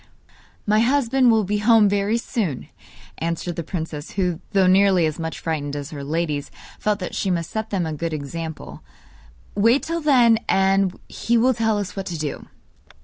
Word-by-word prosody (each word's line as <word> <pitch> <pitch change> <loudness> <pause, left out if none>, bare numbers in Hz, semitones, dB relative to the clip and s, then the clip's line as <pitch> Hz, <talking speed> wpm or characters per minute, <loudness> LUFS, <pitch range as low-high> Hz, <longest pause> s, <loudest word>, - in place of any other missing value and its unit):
'My 215 +1 +3
husband 255 +1 +3
will 220 -2 +4
be 205 +2 -1
home 220 0 +5
very 200 +2 +1
soon,' 205 - -3 0.5
answered 170 +1 -3
the - - -3
princess 160 -2 -6
who, 180 -4 -1
though 195 -3 +3
nearly 190 -2 +4
as 155 +1 -3
much 160 0 -4
frightened 145 -3 -3
as 145 +1 -6
her 145 -2 -6
ladies, 150 -1 -2 0.3
felt 210 -1 0
that 185 -3 -6
she 195 - -1
must 170 -3 -2
set 220 0 -3
them 185 -4 -1
a 160 - -3
good 165 +2 -3
example. 155 +2 -6 0.7
'Wait 230 +7 +3
till 330 +1 -3
then, 245 -7 +5
and 195 -1 +2
he 235 +1 0
will 255 +3 +4
tell 225 -2 0
us 205 -1 -4
what 195 -1 -5
to 170 - -4
do. 150 -3 -5
190 Hz, 180 wpm, -22 LUFS, 160-220 Hz, 0.7 s, home